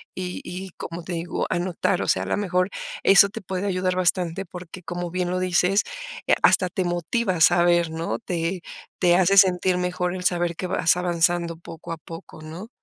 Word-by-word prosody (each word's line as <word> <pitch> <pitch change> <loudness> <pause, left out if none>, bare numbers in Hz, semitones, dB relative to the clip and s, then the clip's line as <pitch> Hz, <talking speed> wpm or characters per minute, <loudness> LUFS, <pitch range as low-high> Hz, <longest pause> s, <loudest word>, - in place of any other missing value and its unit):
y 180 -1 -5
y 185 +1 -7
como 170 0 -6
te 180 - -5
digo, 170 +1 -3
anotar, 180 +1 0
o - - -3
sea, - - +2
a - - -5
lo - - 0
mejor 180 -1 0 0.3
eso 195 +1 +7
te 225 +1 -8
puede 190 +2 -3
ayudar 185 -1 0
bastante 180 0 0
porque, 180 +1 -10
como 175 0 -5
bien 180 -1 -1
lo 185 - -1
dices, 185 +2 +2 0.4
eh, - - +4
hasta 185 - +4
te 185 - -2
motiva 180 +4 -1
a 160 - -4
saber, 175 -1 +4
¿no? 165 +5 -3
Te 175 -2 -3 0.4
te 175 -1 +4
hace 195 +2 +3
sentir 185 -1 +4
mejor 180 0 -1
el 180 - -6
saber 175 -1 +1
que 185 - -4
vas 170 0 +2
avanzando 170 -1 +1
poco 165 -1 -10
a 165 - -4
poco, 165 0 -11
¿no? 165 +8 -9
180 Hz, 195 wpm, -24 LUFS, 170-185 Hz, 0.4 s, eso